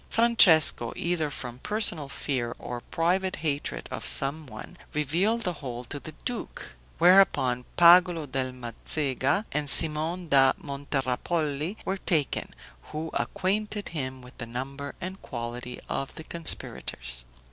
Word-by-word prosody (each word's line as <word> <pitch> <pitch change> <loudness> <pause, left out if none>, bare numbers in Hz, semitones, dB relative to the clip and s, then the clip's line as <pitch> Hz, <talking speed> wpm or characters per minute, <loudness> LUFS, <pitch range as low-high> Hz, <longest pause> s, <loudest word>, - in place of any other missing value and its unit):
Francesco, 180 - +5
either 170 -3 -2
from 125 -3 -8
personal 180 -7 +1
fear, 125 -5 -3
or 120 -1 -7
private 185 +3 0
hatred 140 - -3
of - - -5
some 145 +2 -1
one, 110 +9 -11 0.2
revealed 175 +11 0
the 180 -5 -2
whole 125 -6 -7
to 145 +4 -5
the 155 - -10
duke; 245 -1 -5 0.2
whereupon, 165 -9 +4
Pagolo 175 -1 +6
del 130 -1 -3
Mazecha 130 - -1
and 150 -1 -1
Simon 160 +4 +7
da 135 -3 +4
Monterappoli 145 - -3
were 195 - -2
taken, 160 -6 -1 0.4
who 160 +1 -6
acquainted 205 +2 -2
him 130 -5 -5
with 125 - -15
the 120 - -6
number 135 +4 -6
and 185 +2 -7
quality 120 0 -7
of 135 - -4
the 160 - -8
conspirators. 65 - -3
150 Hz, 130 wpm, -26 LUFS, 130-175 Hz, 0.4 s, Simon